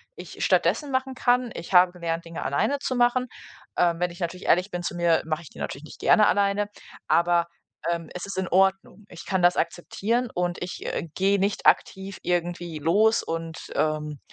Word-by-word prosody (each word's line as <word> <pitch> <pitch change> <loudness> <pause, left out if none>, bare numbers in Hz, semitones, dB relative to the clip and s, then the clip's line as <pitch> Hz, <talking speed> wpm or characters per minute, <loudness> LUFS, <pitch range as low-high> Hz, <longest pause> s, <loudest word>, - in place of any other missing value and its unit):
ich - - -7
stattdessen 295 -2 +2
machen 260 0 -1
kann. 245 -1 +2
Ich 170 +3 -7
habe 180 0 +7
gelernt, 170 -1 -4
Dinge 165 0 -6
alleine 280 - 0
zu 255 - -2
machen. 245 +1 +2 0.5
Ähm, 170 -1 +2
wenn 180 0 +1
ich 175 - -12
natürlich 175 +2 -4
ehrlich 180 +4 +3
bin 175 0 -3
zu 175 - -3
mir, 170 -1 +3
mache 155 +1 -2
ich - - -12
die - - -15
natürlich 140 - -5
nicht - - -13
gerne 215 - +5
alleine, 200 0 +2 0.4
aber, 170 0 +3 0.5
ähm, 170 -2 -3
es 180 - -5
ist 195 -1 -7
in 190 -1 -1
Ordnung. 195 +2 +1
Ich 175 - -11
kann 190 -2 0
das 175 0 +5
akzeptieren 215 +8 -1
und 175 0 -2
ich, 180 - -6
äh, 165 - -3
gehe 195 +1 +2
nicht 200 +1 -1
aktiv 190 0 +1
irgendwie 175 -2 -2
los 210 +9 +3
und, 165 0 -4 0.2
ähm, 150 -2 -1
180 Hz, 195 wpm, -25 LUFS, 170-200 Hz, 0.5 s, habe